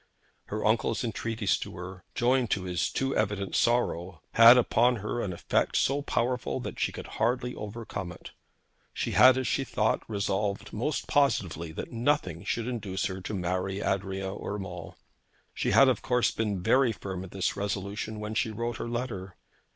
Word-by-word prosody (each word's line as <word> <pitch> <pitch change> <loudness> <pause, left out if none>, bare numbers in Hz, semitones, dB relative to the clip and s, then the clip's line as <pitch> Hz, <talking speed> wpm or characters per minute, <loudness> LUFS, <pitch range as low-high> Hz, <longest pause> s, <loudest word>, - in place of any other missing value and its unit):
Her 105 +1 -4
uncle's 110 +1 +1
entreaties 115 -2 -1
to - - -7
her, 90 +1 -8
joined 125 0 +2
to 95 - 0
his 90 -3 -1
too 135 0 -1
evident 100 -2 -1
sorrow, 95 -8 +1
had 115 +2 +9
upon 125 0 +3
her 110 +2 -3
an 100 - -2
effect 85 - 0
so 140 +2 +2
powerful, 125 -2 -1
that 125 - -6
she - - +1
could - - -8
hardly 125 0 -1
overcome 105 -4 -6
it. 90 - -11 0.6
She - - -2
had, 130 0 +7
as 130 - -1
she 135 - +1
thought, 110 -4 0
resolved 100 -1 -2
most 140 +8 -2
positively 90 - +1
that - - -6
nothing 115 - 0
should 115 0 -2
induce 105 -6 -2
her 95 0 -3
to 100 - -5
marry 95 +2 -2
Adrian 95 0 -2
Urmand. 95 -4 -5 0.6
She - - -1
had 135 - +7
of 125 -5 +2
course 125 -3 +2
been 105 -5 -2
very 130 +3 +4
firm 95 -3 -5
in 95 - -9
this 95 0 -1
resolution 100 +2 -3
when 105 +1 -4
she 110 - +1
wrote 115 +1 -3
her 115 - -4
letter. 115 -6 -4
105 Hz, 170 wpm, -28 LUFS, 95-120 Hz, 0.6 s, had